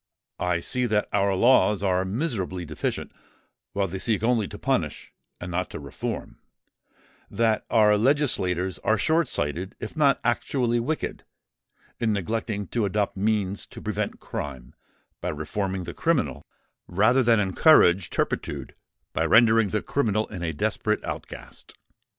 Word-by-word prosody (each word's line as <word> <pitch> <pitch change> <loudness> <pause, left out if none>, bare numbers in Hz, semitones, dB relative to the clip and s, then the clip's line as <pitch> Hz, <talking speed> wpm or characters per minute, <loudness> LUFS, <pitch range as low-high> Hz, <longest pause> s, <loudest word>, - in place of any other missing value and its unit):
I 90 -1 0
see 125 +7 0
that 105 -2 +1
our 100 -1 +2
laws 105 -2 +4
are 95 -1 +2
miserably 95 - -2
deficient, 75 -1 -3 0.6
while 100 -1 0
they 95 +2 -5
seek 110 0 0
only 115 -3 +2
to - - -9
punish - - -2 0.3
and 90 0 -6
not 90 +1 -2
to - - -7
reform—that 105 - -5
our 105 -2 +4
legislators 100 - +1
are 110 +1 +1
short 160 +5 +2
sighted 85 +6 -3
if 110 - -7
not 145 -3 +3
actually 120 0 +1
wicked, 150 +7 -3 0.8
in 110 -2 +1
neglecting 105 +1 -2
to 115 -3 0
adopt 100 +1 -1
means 100 -1 -1
to - - -11
prevent - - -3
crime 65 -4 -6 0.5
by - - -2
reforming 95 +5 -3
the 85 0 -6
criminal, 145 - 0 0.4
rather 110 +8 +3
than 115 -3 +4
encourage 95 - +5
turpitude - - -3 0.4
by - - 0
rendering 115 -2 +5
the 105 - -1
criminal 110 -6 0
a 85 -5 -3
desperate 75 - -1
outcast." - - -8
105 Hz, 135 wpm, -25 LUFS, 90-115 Hz, 0.8 s, encourage